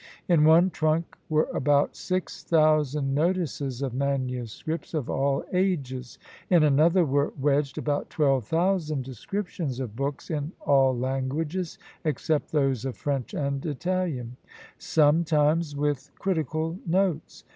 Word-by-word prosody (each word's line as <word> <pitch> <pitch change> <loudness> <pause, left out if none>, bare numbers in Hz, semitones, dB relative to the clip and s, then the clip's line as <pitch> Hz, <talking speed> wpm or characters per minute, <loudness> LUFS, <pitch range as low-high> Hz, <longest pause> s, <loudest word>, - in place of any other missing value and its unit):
"In 165 -4 +4
one 170 +4 +6
trunk 155 +1 0
were 155 0 +2
about 145 +1 +2
six 185 0 -3
thousand 150 -3 +2
notices 145 -5 -1
of 130 -3 -2
MSS. 130 +3 -3
of 145 -6 -2
all 135 0 0
ages. 140 -10 -1 0.3
In 175 -4 +5
another 160 +5 +4
were 140 0 +1
wedged 140 -1 +1
about 145 -1 -1
twelve 135 -5 +2
thousand 160 - 0
descriptions 140 - -4
of 120 -5 -5
books 140 +4 -4
in 150 +2 -3
all 135 -3 +3
languages, 140 +7 -2 0.3
except 155 0 -1
those 135 -6 +1
of 135 -2 -4
French 140 -4 -3
and 140 -1 -2
Italian; 155 -6 -2 0.4
sometimes 155 0 +2
with 145 -1 -1
critical 165 -2 -2
notes. 175 -2 0
150 Hz, 125 wpm, -26 LUFS, 135-165 Hz, 0.4 s, one